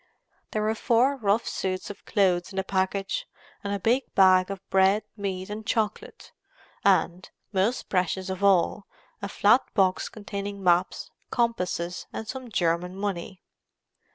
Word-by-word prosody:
There 215 - -1
were 215 +1 +1
four 245 +4 +2
rough 220 -2 +1
suits 185 +1 -3
of 205 - -14
clothes 185 -3 +1
in - - -10
the 190 - +1
package; 195 - -1 0.4
a 200 0 -1
big 240 +7 0
bag 185 -1 +5
of 195 -1 -7
bread, 195 +2 +4
meat, 190 -3 -4
and 210 +1 -6
chocolate; 220 - -3 0.5
and, 180 +2 +2 0.2
most 200 +6 0
precious 185 0 0
of 190 +1 -4
all, 195 +1 +3 0.3
a 200 - -4
flat 210 +6 +4
box 190 -3 +2
containing 200 -1 -6
maps, 180 0 +1 0.2
compasses, 180 -7 -1
and 220 - -6
some 255 0 -6
German 180 -2 0
money. 195 -2 -4
195 Hz, 140 wpm, -26 LUFS, 185-215 Hz, 0.5 s, bag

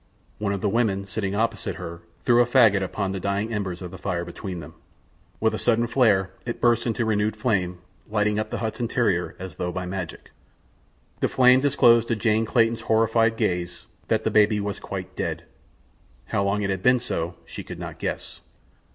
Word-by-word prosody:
One 105 -1 -1
of 100 -1 -2
the - - +1
women 100 -3 +1
sitting 100 -1 -3
opposite 115 0 -1
her 85 -3 -7 0.2
threw 120 0 +5
a - - +4
faggot 115 -6 +5
upon 95 +1 -2
the 95 - -3
dying 100 +4 -1
embers 95 -4 -3
of 90 - -7
the 95 - -10
fire 90 -3 -2
between 90 +1 -6
them. 75 - -10 0.7
With 110 0 +2
a - - -2
sudden 120 -1 +2
flare 110 -6 +3
it 120 - -4
burst 120 0 +2
into 115 0 0
renewed 110 0 +1
flame, 95 -6 0 0.3
lighting 105 0 +1
up 110 0 -3
the - - -3
hut's 110 +1 -3
interior 115 -7 0
as 95 -4 -8
though 90 - -2
by 90 +1 -4
magic. 90 -2 -6 0.9
The - - +2
flame 125 0 +6
disclosed 120 -5 +4
to 115 - +1
Jane 110 0 +1
Clayton's 115 0 +2
horrified 115 0 +2
gaze 90 -2 -2 0.2
that - - +1
the - - 0
baby 105 0 +4
was 100 -1 -3
quite - - -6
dead. - - -3 0.8
How 100 - 0
long 100 +1 0
it 100 - 0
had 95 -1 -2
been 125 +4 +4
so 85 -8 -3
she - - -7
could - - -8
not - - -7
guess. - - -4
105 Hz, 195 wpm, -24 LUFS, 95-115 Hz, 0.9 s, flame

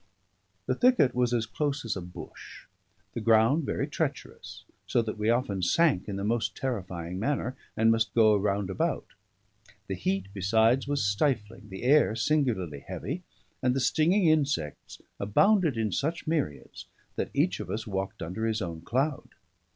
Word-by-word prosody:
The - - +1
thicket 245 - +4
was 125 -1 +1
as 115 -2 +1
close 145 +3 -2
as 110 - -2
a 95 - -4
bush; 90 0 -11 0.5
the 115 - -4
ground 115 +7 +4
very - - -1
treacherous, - - -5 0.2
so 120 - +2
that 110 -1 -5
we 105 +1 +1
often 120 -5 +1
sank 110 - +2
in 100 - -3
the 100 - -4
most 115 +2 -1
terrifying 90 -8 -4
manner, 130 +2 -1 0.2
and 115 +1 +4
must 115 0 0
go 110 -2 +6
round 100 -1 0
about; 95 - -1 0.8
the 95 - -4
heat, 95 +1 -2
besides, 110 +6 +2
was 145 -6 0
stifling, 105 0 -1
the 95 +3 -8
air 135 -4 +4
singularly 110 - 0
heavy, 150 - -5 0.4
and 125 0 +2
the - - +1
stinging 165 - +3
insects 145 - 0 0.2
abounded 160 - +3
in 110 -2 0
such 160 - -2
myriads 155 - -3 0.3
that - - -2
each - - +1
of - - -6
us 110 +1 -3
walked 95 -3 -4
under 95 +7 -3
his 110 -1 0
own 85 -5 -5
cloud. 130 - -1
115 Hz, 160 wpm, -28 LUFS, 100-140 Hz, 0.8 s, go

